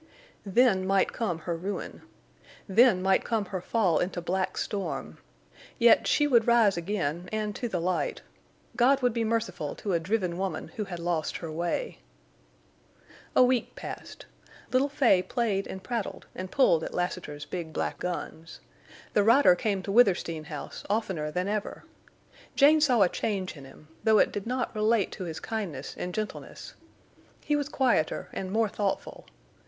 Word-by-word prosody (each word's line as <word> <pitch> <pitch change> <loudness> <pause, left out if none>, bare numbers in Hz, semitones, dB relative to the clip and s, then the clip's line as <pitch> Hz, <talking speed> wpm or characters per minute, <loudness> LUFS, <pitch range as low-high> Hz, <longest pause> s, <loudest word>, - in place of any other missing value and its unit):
Then 195 -3 +3
might 195 0 +2
come 200 -9 -2
her 170 +1 -3
ruin. 190 +5 -5 0.7
Then 205 -2 +5
might 190 0 +3
come 225 -3 -1
her 185 -1 -5
fall 190 -4 +1
into 180 0 -2
black 185 +2 -2
storm. 165 - -4 0.6
Yet 235 0 +5
she 295 - +3
would 240 -5 +3
rise 230 -4 +5
again, 175 -2 -3
and 215 -1 -2
to 240 - -3
the 180 - -1
light. 180 +2 -1 0.5
God 265 +2 +3
would 245 -2 +3
be 230 0 0
merciful 220 -9 -2
to 200 - -3
a 170 - +2
driven 180 -1 -1
woman 190 -1 -3
who 220 -5 -5
had 180 -3 -6
lost 170 -2 -2
her 165 -2 -6
way. 175 - -3 1.4
A - - +7
week 250 -1 +1
passed. - - -8 0.5
Little 260 +3 +2
Fay 250 -10 +4
played 210 -2 -1
and 190 0 -7
prattled 235 -4 -4
and 185 0 -6
pulled 175 - +3
at - - -5
Lassiter's 175 -5 -3
big 170 -3 -5
black - - -3
guns. 170 -2 -5 0.5
The 210 - +4
rider 230 -2 +6
came 195 +1 -1
to 195 - -4
Withersteen 180 -8 +3
House 150 -2 -7
oftener 190 -8 -1
than 180 +4 -2
ever. 210 0 -3 0.7
Jane 300 +2 +6
saw 250 -8 +5
a - - +5
change 190 -1 -3
in 140 -2 -11
him, 135 +3 -16 0.2
though 220 -1 +5
it - - +4
did 205 +1 -5
not 255 0 -2
relate 215 -1 +2
to 185 - -6
his 160 -2 -5
kindness 190 -12 -5
and 180 - -4
gentleness. 215 +3 -6 0.7
He 295 - 0
was 290 0 -1
quieter 250 - +1
and 190 -1 -4
more 220 +1 +2
thoughtful. 200 -1 -3
195 Hz, 165 wpm, -28 LUFS, 175-230 Hz, 1.4 s, A